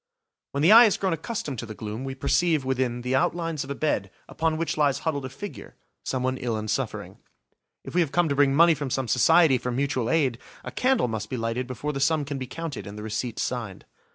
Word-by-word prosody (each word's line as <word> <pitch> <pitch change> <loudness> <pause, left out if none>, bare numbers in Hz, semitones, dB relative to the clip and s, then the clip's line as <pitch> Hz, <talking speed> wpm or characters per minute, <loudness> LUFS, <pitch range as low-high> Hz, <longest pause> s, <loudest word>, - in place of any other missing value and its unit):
When 140 +1 -1
the 170 - +6
eye 230 +2 +10
has 210 - +2
grown 190 -3 0
accustomed 160 - -4
to 120 - -6
the 110 - -8
gloom, 110 +3 -6
we 135 0 -5
perceive, 155 +1 +1
within, 125 -2 -1
the 125 +1 -1
outlines 165 +2 0
of 135 - -11
a 140 - -3
bed 120 -10 -1 0.2
upon 160 -1 -1
which 165 0 -2
lies 145 -3 +2
huddled 145 -4 -1
a - - -5
figure–someone 130 -7 -5
ill 120 -4 -2
and 110 -1 -3
suffering. - - -3 0.6
If - - -9
we 180 - +3
have 155 -5 0
come 175 -1 +2
to 140 - 0
bring 140 -1 +3
money 170 +2 +6
from 145 -3 -4
some 130 0 -1
society 160 +3 +5
for 125 - -4
mutual 130 -2 -1
aid, 135 -7 +1 0.2
a - - -6
candle 255 - +2
must 110 -1 -4
be 130 - -3
lighted 115 +2 -2
before 130 +4 -4
the 135 - -3
sum 150 +1 +2
can 140 -1 -4
be 130 - -5
counted 160 -6 -6
and 100 +1 -8
the 105 - -7
receipt 110 +2 -3
signed. 115 -7 -4
135 Hz, 230 wpm, -25 LUFS, 120-160 Hz, 0.6 s, eye